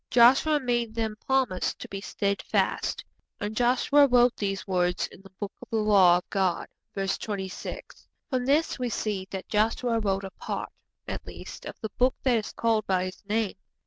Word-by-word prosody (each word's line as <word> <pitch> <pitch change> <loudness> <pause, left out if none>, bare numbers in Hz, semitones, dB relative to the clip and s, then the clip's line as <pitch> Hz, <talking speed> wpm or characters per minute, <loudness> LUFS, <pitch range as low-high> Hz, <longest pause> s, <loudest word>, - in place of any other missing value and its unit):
Joshua 265 +6 +6
made 240 -4 -1
them 220 -2 -1
promise 260 -9 +1
to - - -9
be 195 0 -6
steadfast. 200 0 -1 0.3
'And 210 0 -3
Joshua 255 +4 +4
wrote 245 -1 +5
these 195 -2 -2
words 180 -1 +1
in - - -13
the 195 - -15
Book 205 -1 -3
of - - -11
the - - -2
Law 200 -5 +6
of 180 - -7
God.' 190 -3 0 0.3
(Verse 195 -1 -1
26.) 190 -3 -6 0.2
From 255 -4 -1
this 295 +1 +2
we 250 -1 -1
see 205 -4 -2
that 190 -1 -6
Joshua 225 +2 +1
wrote 195 -2 0
a 190 - -6
part, - - -5 0.4
at - - -5
least, - - -9
of - - -7
the 220 - -4
Book 255 +1 +4
that 250 -3 +4
is 215 - -3
called 225 -2 +1
by 185 -1 +2
his 185 0 -7
name. 215 -2 +1
215 Hz, 180 wpm, -27 LUFS, 195-245 Hz, 0.4 s, Joshua